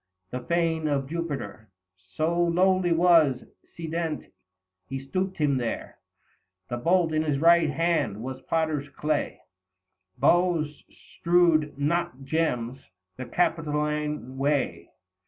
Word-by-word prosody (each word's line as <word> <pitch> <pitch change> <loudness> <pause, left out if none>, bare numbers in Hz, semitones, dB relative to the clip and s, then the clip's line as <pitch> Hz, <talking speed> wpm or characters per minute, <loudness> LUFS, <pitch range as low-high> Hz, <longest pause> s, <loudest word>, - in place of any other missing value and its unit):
The 125 - -3
Fane 160 +3 0
of 140 -2 0
Jupiter 140 - -5 0.5
So 160 +2 0
lowly 185 +1 +2
was, 165 -6 +4 0.3
sedent 165 -1 -4 0.6
he 135 - -4
stooped 185 +8 -3
him 145 -3 +2
there; 120 -2 -4 0.7
The 120 - -1
bolt 165 +4 +2
in 155 - +2
his 150 -3 0
right 165 +1 +5
hand 150 - 0
was 130 +1 -6
potter's 155 -3 0
clay: 150 +1 -2 0.8
Boughs 170 -4 +2
strew'd, 170 -4 +1
not 145 -2 -1
gems, 135 -4 -1 0.4
the 130 - -5
Capitoline 150 -4 -1
way. 140 0 0
155 Hz, 110 wpm, -26 LUFS, 135-170 Hz, 0.8 s, right